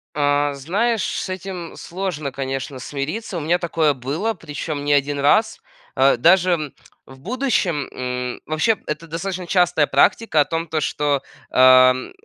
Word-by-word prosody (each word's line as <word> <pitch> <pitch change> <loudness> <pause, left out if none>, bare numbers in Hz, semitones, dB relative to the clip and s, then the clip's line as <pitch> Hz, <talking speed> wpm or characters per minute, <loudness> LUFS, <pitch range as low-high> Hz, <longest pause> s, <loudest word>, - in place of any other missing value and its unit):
А, 145 0 +1
знаешь, 200 - -1
с - - -3
этим 185 -2 -6
сложно, 170 -6 -4
конечно, 135 0 -5
смириться. 155 - -4
У - - -3
меня 170 +4 +1
такое 160 -3 +1
было, 145 - -2
причём 150 -4 -6
не 145 - +2
1 145 0 +1
раз. 215 +11 +2 0.4
А, 135 -1 +4
даже, 180 +9 +4
м, 155 -5 -2 0.3
в 135 0 -15
будущем, 195 - -1
м, 125 -1 -4
вообще, 160 +8 +1
это 150 +2 -5
достаточно 180 +2 -5
частая 175 -5 +2
практика 160 +3 +3
о - - +2
том, 165 +2 -3
то 155 0 -2
что, 145 -1 0 0.3
ам, 130 0 +5
155 Hz, 150 wpm, -21 LUFS, 140-180 Hz, 0.4 s, ам